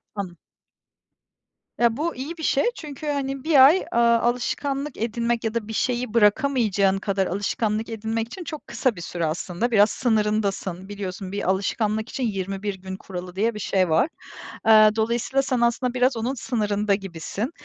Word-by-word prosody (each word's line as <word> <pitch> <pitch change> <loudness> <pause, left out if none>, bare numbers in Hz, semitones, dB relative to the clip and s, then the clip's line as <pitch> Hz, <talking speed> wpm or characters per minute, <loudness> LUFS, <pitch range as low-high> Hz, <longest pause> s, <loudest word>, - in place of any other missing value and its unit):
Anladım. 185 -4 -5 1.4
Ya, 235 -1 +3
bu 330 +3 -2
iyi 295 +7 -6
bir 320 - -8
şey 275 - +2
çünkü 300 -1 -8
hani 275 -2 -2
1 290 -5 +7
ay, 335 +7 +4
aaa, 235 0 +4
alışkanlık 270 +4 -1
edinmek 235 +1 -1
ya 220 0 -1
da 230 -3 -2
bir 220 - -6
şeyi 245 0 -1
bırakamayacağın 210 -3 +3
kadar 195 -1 0
alışkanlık 210 +3 -1
edinmek 225 0 -2
için 345 +9 -8
çok 310 -2 -8
kısa 255 -5 0
bir 170 - -8
süre 170 -1 -3
aslında. 175 +8 -2
Biraz 210 -1 +5
sınırındasın. 210 -5 -1
Biliyorsun 195 -2 -6
bir 200 -2 -2
alışkanlık 215 +3 0
için 265 - -4
21 195 -2 -2
gün 190 0 -8
kuralı 180 -2 -8
diye 225 +4 +1
bir 210 - -7
şey 190 -3 +1
var. 160 - +3 0.6
Eee, 215 -1 +8
dolayısıyla 235 +4 +1
sen 260 -3 -1
aslında 240 +1 +1
biraz 250 0 +2
onun 235 +4 -1
sınırında 210 -5 0
gibisin. 195 - -5
220 Hz, 165 wpm, -24 LUFS, 200-250 Hz, 1.4 s, Eee